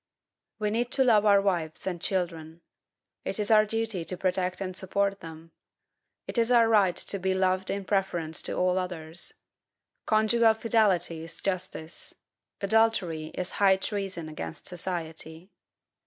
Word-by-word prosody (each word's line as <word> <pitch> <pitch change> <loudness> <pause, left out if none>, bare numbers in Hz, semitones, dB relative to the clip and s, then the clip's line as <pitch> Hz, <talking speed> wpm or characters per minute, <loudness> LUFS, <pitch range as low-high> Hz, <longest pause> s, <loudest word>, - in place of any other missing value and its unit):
We 210 -1 -1
need 235 +2 0
to 270 - +4
love 215 -4 +4
our 200 -1 +6
wives 175 -6 -1
and 180 -3 -3
children. 170 -4 -3 0.6
It - - -3
is 210 0 -1
our 215 -1 +6
duty 225 -4 -2
to 185 - -5
protect 185 0 -1
and 185 -2 -4
support 195 +1 0
them. 165 0 -11 0.7
It - - -2
is 230 0 +2
our 235 -2 +5
right 205 -5 +4
to 200 - +1
be 190 +1 0
loved 185 0 +1
in 200 -1 -3
preference 175 -5 -1
to - - -2
all 185 0 +2
others. 175 -2 -4 0.7
Conjugal 220 +1 +4
fidelity 205 -8 +1
is 165 0 -8
justice. 185 -4 -4 0.5
Adultery 200 -7 +2
is 180 - -3
high 195 -1 +6
treason 190 -4 -3
against 155 0 -7
society. 170 -1 -6
190 Hz, 145 wpm, -28 LUFS, 170-210 Hz, 0.7 s, our